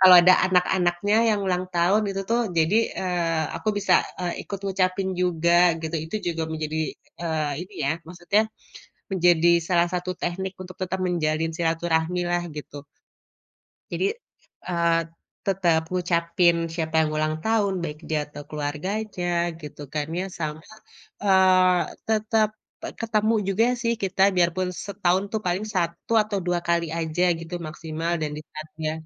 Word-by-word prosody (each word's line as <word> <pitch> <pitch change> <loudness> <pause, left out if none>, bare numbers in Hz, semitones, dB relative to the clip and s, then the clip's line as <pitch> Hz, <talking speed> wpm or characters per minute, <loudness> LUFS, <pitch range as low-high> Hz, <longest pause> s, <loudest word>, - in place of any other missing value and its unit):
kalau 185 -1 +10
ada 185 +1 +8 0.2
anak-anaknya 180 +2 +2
yang 210 - +1
ulang 180 0 0
tahun 185 +5 +3
itu 195 0 -3
tuh, 235 - +3 0.2
jadi, 165 +7 +3 0.2
eee, 170 -3 0
aku - - -3
bisa, - - +3 0.3
eee, 175 -1 -3
ikut 200 - -4
ngucapin 190 0 0
juga 175 0 +4
gitu. 160 0 -4
Itu 160 +7 -4
juga 165 -1 -2
menjadi 155 0 -3 0.4
eee, 155 -3 -1
ini 195 +2 -18
ya, 140 - +2 0.2
maksudnya 180 +4 +1 0.7
menjadi 175 -2 +4 0.2
salah 175 -1 +3
satu 180 0 -2
teknik 190 +2 -3
untuk 185 -1 -11
tetap 185 +1 -2
menjalin 160 -2 0
silaturahmi 165 +1 0
lah 175 0 0
gitu. 145 -1 -8 1.1
Jadi, - - -1 0.6
eee, 170 -1 +2 0.5
tetep 175 -4 +2
ngucapin 170 -1 +2 0.2
siapa 160 -1 -3
yang 155 - 0
ulang 155 0 0
tahun, 220 -3 +2
baik 150 -2 -5
dia 155 -1 +1
atau 145 0 -9
keluarganya 175 +7 -3 0.3
gitu 150 -1 -10
kan 150 -1 -1
ya - - -1 0.2
sama, 155 0 -3 0.6
eee, 185 -2 +5 0.3
tetep 215 0 +2 0.5
ketemu 220 0 +1
juga 215 +4 +3 0.2
sih 235 -1 +2
kita 190 0 +1
biarpun 180 +1 +2 0.2
setahun 190 -1 +1
tuh 220 - 0
paling 180 +4 0
satu 170 +3 -2
atau 210 -2 -3
dua 175 -1 +1
kali 170 -1 +2
aja 165 +2 -1 0.2
gitu 165 +1 -7
maksimal 160 +1 -4
dan 150 -1 -1
di - - -5
saat 155 0 -7
dia 155 0 -1
175 Hz, 145 wpm, -25 LUFS, 160-190 Hz, 1.1 s, kalau